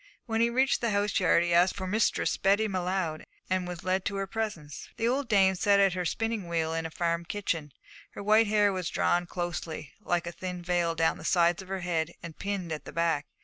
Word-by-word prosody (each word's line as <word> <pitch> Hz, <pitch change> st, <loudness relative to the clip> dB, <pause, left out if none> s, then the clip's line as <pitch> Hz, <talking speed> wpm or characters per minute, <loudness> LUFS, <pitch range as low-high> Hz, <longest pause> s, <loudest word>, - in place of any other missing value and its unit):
When 225 Hz, -1 st, 0 dB
he 235 Hz, -, +4 dB
reached 260 Hz, +3 st, +2 dB
the 235 Hz, -, +1 dB
house 205 Hz, 0 st, +1 dB
yard 180 Hz, -2 st, +4 dB
he 175 Hz, 0 st, 0 dB
asked 175 Hz, +2 st, +4 dB
for 190 Hz, -, -4 dB
Mistress 210 Hz, +4 st, +1 dB
Betty 200 Hz, +3 st, +2 dB
M'Leod, 180 Hz, -4 st, -2 dB, 0.3 s
and 185 Hz, -1 st, 0 dB
was 175 Hz, -2 st, -6 dB
led 185 Hz, 0 st, 0 dB
to 200 Hz, -, -1 dB
her 195 Hz, 0 st, -1 dB
presence. 190 Hz, -9 st, -5 dB
The 230 Hz, -, 0 dB
old 260 Hz, +1 st, 0 dB
dame 195 Hz, -3 st, +5 dB
sat 200 Hz, +2 st, +3 dB
at 195 Hz, -2 st, +4 dB
her 180 Hz, -1 st, -2 dB
spinning 225 Hz, 0 st, -2 dB
wheel 165 Hz, -1 st, -1 dB
in 165 Hz, 0 st, -2 dB
a -, -, -10 dB
farm 170 Hz, +1 st, -1 dB
kitchen. 170 Hz, -5 st, -3 dB, 0.4 s
Her -, -, -7 dB
white 215 Hz, +2 st, +5 dB
hair 205 Hz, -1 st, +3 dB
was 185 Hz, -2 st, -2 dB
drawn 175 Hz, 0 st, +1 dB
closely, 175 Hz, -5 st, -5 dB
like 175 Hz, -4 st, 0 dB
a 170 Hz, -, -4 dB
thin 180 Hz, 0 st, -6 dB
veil, 175 Hz, -1 st, 0 dB
down 165 Hz, 0 st, +1 dB
the -, -, -10 dB
sides 175 Hz, 0 st, +3 dB
of 190 Hz, -, -12 dB
her 190 Hz, 0 st, -4 dB
head 170 Hz, -2 st, -1 dB
and 165 Hz, -2 st, -8 dB
pinned 195 Hz, -4 st, -4 dB
at 155 Hz, -, -5 dB
the -, -, -8 dB
back. 165 Hz, -3 st, 0 dB
185 Hz, 230 wpm, -29 LUFS, 170-205 Hz, 0.4 s, dame